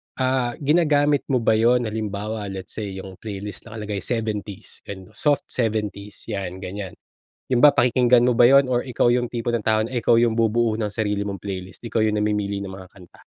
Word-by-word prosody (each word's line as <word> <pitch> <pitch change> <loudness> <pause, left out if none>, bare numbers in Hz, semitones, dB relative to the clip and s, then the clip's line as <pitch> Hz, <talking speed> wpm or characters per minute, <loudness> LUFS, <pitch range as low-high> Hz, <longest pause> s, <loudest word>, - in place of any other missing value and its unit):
Ah, 130 -2 0
ginagamit 145 -2 +3
mo 130 -3 +2
ba 110 - +4
yun, 120 +3 +3
halimbawa, 105 0 -4
let's 95 -2 -7
say 105 -2 -4
yung 95 -1 -9
playlist 105 -2 -7
nakalagay 105 -2 -5
70s 105 -1 -4
ganun, 95 -2 -9
soft 145 -2 +1
70s 105 -3 -2
yan, 95 -2 -4
ganiyan. 95 0 -6 0.5
Yun 125 +1 +3
ba, 145 - +9
pakikinggan 125 0 +4
mo 120 - +2
ba 120 - +6
yun 135 +1 +6
or 125 -1 0
ikaw 125 -2 +1
yung 120 0 +2
tipo 120 0 -3
ng 120 -3 -1
tao 110 0 +3
na 110 - -1
ikaw 115 -1 +3
yung 115 -2 +2
bubuo 115 0 +2
ng 105 -2 -3
sarili 105 -2 -1
mong 100 -3 -5
playlist, 95 -2 -7
ikaw 115 -1 -2
yung 105 -1 +1
namimili 105 -1 -1
ng 100 - -5
mga 95 -1 -10
kanta? 90 -3 -17
110 Hz, 195 wpm, -23 LUFS, 100-120 Hz, 0.5 s, ba